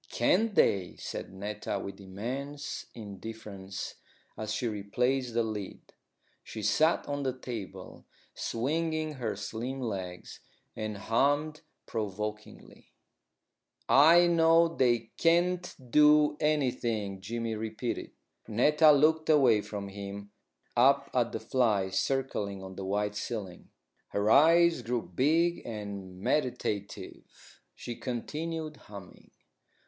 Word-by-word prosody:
"Can't 220 -2 +2
they?" 95 -3 +2
said - - -6
Netta 100 +2 -4
with 100 +1 -7
immense 130 +10 -5
indifference, 100 -2 -7 0.4
as 110 0 -4
she 120 - -1
replaced 120 +4 -1
the 120 - +3
lid. 105 -3 -6 0.5
She 110 - -7
sat 160 - +2
on 145 0 -2
the 130 -2 -2
table, 115 -6 -8 0.3
swinging 155 +5 -1
her 120 -6 -3
slim 115 +6 -5
legs, 95 -7 -5 0.4
and 110 -1 -4
hummed 145 +8 +1 0.2
provokingly. 105 0 -6 0.9
"I 165 +5 +7
know 165 0 +4
they 120 -3 +2
can't 175 +2 +2 0.2
do 150 0 +6
anything," 120 -9 0
Jimmy 115 +3 -3
repeated. 110 +2 -4 0.4
Netta 150 +8 +5
looked 155 +2 +3
away 130 -8 +5
from 100 -1 -6
him, 100 +1 -7 0.4
up 140 +3 +4
at 120 -2 +1
the - - -3
flies 105 -7 +1
circling 105 -8 -2
on 95 0 -9
the 95 - -6
white 105 +1 -1
ceiling. 100 -4 -5 0.4
Her 105 +2 0
eyes 165 +1 +6
grew 120 0 -2
big 160 - +1
and 100 -4 -7
meditative. 120 -7 -3
She 120 - -6
continued 155 +6 -4
humming. 100 -7 -13
120 Hz, 110 wpm, -30 LUFS, 100-150 Hz, 0.9 s, I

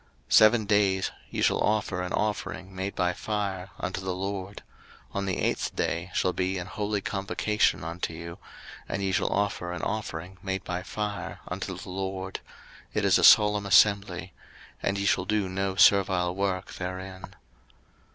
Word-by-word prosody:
03:023:036 - - -1
Seven 110 0 +6
days 100 -2 +2 0.2
ye - - -3
shall - - +3
offer 105 -4 +1
an 90 - -4
offering 100 -2 -2
made 95 +1 -3
by 90 0 +1
fire 100 -2 -3
unto 95 - -3
the 95 -1 -3
LORD: 95 +1 -5 0.5
on 100 0 -2
the 95 - -1
eighth - - -1
day 85 +3 -1
shall 90 - +1
be 95 +1 -1
an 90 - -4
holy 105 +1 -2
convocation 100 +1 0
unto 85 +1 -3
you; 85 +1 -8 0.5
and 100 - -2
ye 95 - 0
shall 95 - +1
offer 100 -3 -1
an 90 -1 -5
offering 95 -4 -4
made 95 -1 -3
by 90 0 -3
fire 105 -2 -4
unto - - -4
the - - -9
LORD: 95 0 -4 0.6
it - - +1
is - - +5
a - - 0
solemn 105 -1 +7
assembly; 100 -2 +3 0.5
and 100 - 0
ye 100 - -1
shall 90 -1 +2
do 105 -1 0
no 95 +1 -2
servile 95 -3 +4
work 95 -1 -2
therein. 95 +1 -6
95 Hz, 165 wpm, -27 LUFS, 90-100 Hz, 0.6 s, solemn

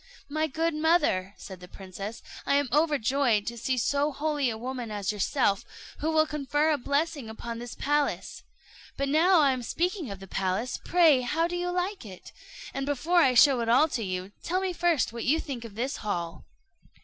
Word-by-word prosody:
"My 310 +2 0
good 325 +3 -1
mother," 305 - +1
said 190 -2 -10
the 180 - -11
princess, 195 +4 -8 0.2
"I 280 - +1
am 285 -2 +1
overjoyed 275 -7 +2
to 235 - -4
see 255 +3 -1
so 285 +6 +1
holy 290 -1 -1
a 220 - -4
woman 245 0 -5
as 205 -2 -2
yourself, 210 0 0 0.4
who 310 - -1
will 315 -1 +3
confer 300 +1 0
a 295 - +1
blessing 285 -1 -1
upon 230 +1 -6
this 240 0 -8
palace. 290 0 -1 0.6
But 275 0 -1
now 330 +4 +5
I 280 -2 +4
am 255 -1 -2
speaking 345 - -2
of 200 -1 -7
the 195 - -10
palace, 190 +6 -2
pray 325 -7 +4
how 315 +7 0
do 350 - -4
you 355 0 -2
like 365 +1 -2
it? 190 -5 -11 0.4
And 275 0 -3
before 310 +5 0
I 255 -4 +3
show 270 0 +6
it 230 -1 -1
all 260 +7 +5
to 235 -5 -2
you, 185 0 -4
tell 365 +2 -1
me 380 -1 -2
first 340 -9 +1
what 235 - -5
you 305 +5 +2
think 260 -7 -5
of 215 -3 -10
this 255 +5 -2
hall." 170 -6 -4
275 Hz, 195 wpm, -27 LUFS, 225-310 Hz, 0.6 s, show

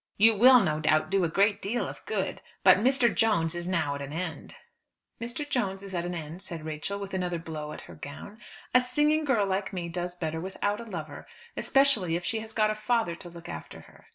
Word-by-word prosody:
"You 225 +2 +6
will 250 +3 +8
no 155 -5 0
doubt 155 +2 +2
do 195 -1 +3
a 170 - +1
great 200 +5 +2
deal 230 +5 -1
of - - -9
good. - - -2 0.2
But - - +7
Mr. 250 +1 +4
Jones 190 -8 +2
is 175 0 -4
now 170 -6 0
at 140 - -5
an 140 0 -6
end." 165 +1 -5 0.7
"Mr. 240 +6 -4
Jones 200 -8 -1
is 195 -1 -8
at 175 -1 -1
an 175 0 -3
end," 165 +2 -7
said 170 -5 -7
Rachel, 155 +6 -4
with 195 -1 -7
another 180 -2 -1
blow 155 -2 -6
at - - -8
her - - -12
gown. 180 +9 -9 0.3
"A 250 - +7
singing 295 +5 +2
girl 235 -8 +2
like 195 0 -1
me 175 -3 -4
does 175 +1 -4
better 160 -2 -3
without 205 +3 -2
a - - -8
lover, 160 -8 -7 0.3
especially 250 -12 +3
if 175 - -3
she 225 - 0
has 220 0 -8
got 215 -1 +2
a - - -2
father 220 -4 0
to 175 - -10
look 170 0 -11
after - - -8
her." - - -19
190 Hz, 225 wpm, -28 LUFS, 165-220 Hz, 0.7 s, will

